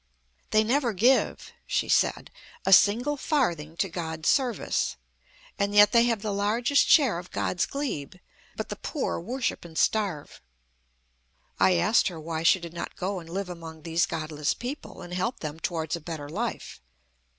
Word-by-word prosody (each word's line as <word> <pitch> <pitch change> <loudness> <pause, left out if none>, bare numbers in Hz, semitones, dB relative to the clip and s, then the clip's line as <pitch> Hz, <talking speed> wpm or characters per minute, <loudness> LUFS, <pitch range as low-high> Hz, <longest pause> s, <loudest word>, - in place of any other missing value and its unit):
"They 215 0 +4
never 240 +1 +1
give," 245 +7 +2
she - - 0
said, - - +1 0.3
"a 195 - +5
single 245 +10 +5
farthing 170 - -1
to 195 - +1
God's 160 -3 -3
service; 240 - 0 0.6
and 200 0 0
yet 205 0 +7
they 235 0 +5
have 230 -3 0
the 210 -2 -2
largest 230 +7 +2
share 260 - +5
of 180 - -11
God's 175 - -1
glebe. 260 - -4 0.4
But - - -5
the - - -5
poor 295 - -3
worship 240 +8 -3
and 165 -2 -10
starve." 195 -9 0 1.2
I 185 - +5
asked 175 +7 +3
her 175 -5 -5
why 160 0 -4
she 170 +3 +4
did 170 -1 -9
not 170 - -6
go 190 +1 -3
and 165 -1 -12
live 195 +2 -3
among 165 -3 -9
these 165 +1 +1
godless 155 -2 -2
people, 250 -6 -7
and 175 0 -9
help 230 +8 -2
them 155 0 -5
towards 160 -2 -2
a 170 - -7
better 155 -2 -6
life. 220 - -4
185 Hz, 165 wpm, -27 LUFS, 165-235 Hz, 1.2 s, yet